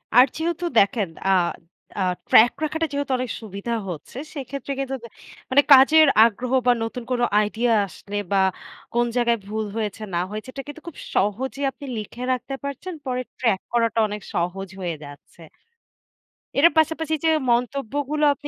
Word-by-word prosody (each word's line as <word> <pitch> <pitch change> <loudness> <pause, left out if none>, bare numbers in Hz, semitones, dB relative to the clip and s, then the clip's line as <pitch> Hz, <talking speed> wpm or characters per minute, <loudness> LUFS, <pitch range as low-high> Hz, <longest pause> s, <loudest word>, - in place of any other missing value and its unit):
আর 250 +1 +9
যেহেতু 340 +2 -2
দেখেন 200 -1 +2 0.2
আ - - +4 0.7
আ - - +2 0.3
ট্র্যাক 235 +2 +7
রাখাটা 320 +1 -1
যেহেতু 285 -1 -2
অনেক 250 -1 -3
সুবিধা 210 +2 -5 0.2
হচ্ছে 170 +7 -8 0.2
সেক্ষেত্রে 275 -1 -6
কিন্তু 270 0 -2
দে - - -7 0.4
মানে 275 +2 +6
কাজের 310 +4 +7 0.2
আগ্রহ 235 +3 0 0.2
বা 245 - +7
নতুন 230 +2 -5
কোন 245 -1 0 0.2
আইডিয়া 225 +3 +1
আসলে 200 +2 -10 0.2
বা 200 - +3 0.6
কোন 240 0 +2
জায়গায় 235 -1 +2
ভুল 215 +1 -2
হয়েছে 215 -1 -3
না 170 - +1
হয়েছে 215 +3 -6
এটা 275 - -6
কিন্তু 290 +2 -9
খুব 340 - -8 0.2
সহজেই 260 +8 0
আপনি 280 +2 -11
লিখে 215 +3 -7
রাখতে 255 +2 -4
পারছেন। 280 +6 -5
পরে 255 -1 -1 0.2
ট্র্যাক 225 -6 +2
করাটা 230 -1 +1
অনেক 210 0 -6
সহজ 180 +3 -2
হয়ে 175 -3 -2
যাচ্ছে। 145 +3 -13 1.2
এটার 330 +5 +6
পাশাপাশি 320 0 0
যে - - +5 0.2
মন্তব্যগুলো 275 +4 -1
আপনি 290 +2 -9
245 Hz, 160 wpm, -23 LUFS, 215-280 Hz, 1.2 s, আর